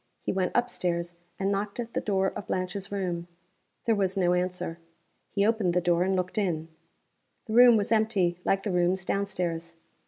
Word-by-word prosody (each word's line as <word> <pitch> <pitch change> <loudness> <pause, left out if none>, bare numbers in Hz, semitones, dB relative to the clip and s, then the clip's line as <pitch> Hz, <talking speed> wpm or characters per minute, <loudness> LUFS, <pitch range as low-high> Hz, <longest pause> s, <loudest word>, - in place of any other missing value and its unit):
He - - -2
went 185 -1 -1
up 245 0 +3
stairs, 170 -3 -2 0.2
and 195 +1 0
knocked 200 +2 -2
at 235 -1 -4
the - - 0
door 190 -2 +1
of 200 - -6
Blanche's 185 +2 -3
room. 175 -4 -2 0.6
There 230 - +3
was 195 -2 0
no 180 -2 +3
answer. 180 -2 -2 0.5
He 200 0 +1
opened 210 -6 +1
the - - +5
door 175 -1 +2
and 190 +1 +1
looked 185 +3 -1
in. 165 -5 -1 0.8
The 220 - -5
room 240 -1 +8
was 205 +1 -1
empty, 205 -6 +2
like 195 0 +1
the 205 - -1
rooms 180 +1 +1
down 200 +1 0
stairs. 170 -3 -3
190 Hz, 190 wpm, -28 LUFS, 175-205 Hz, 0.8 s, room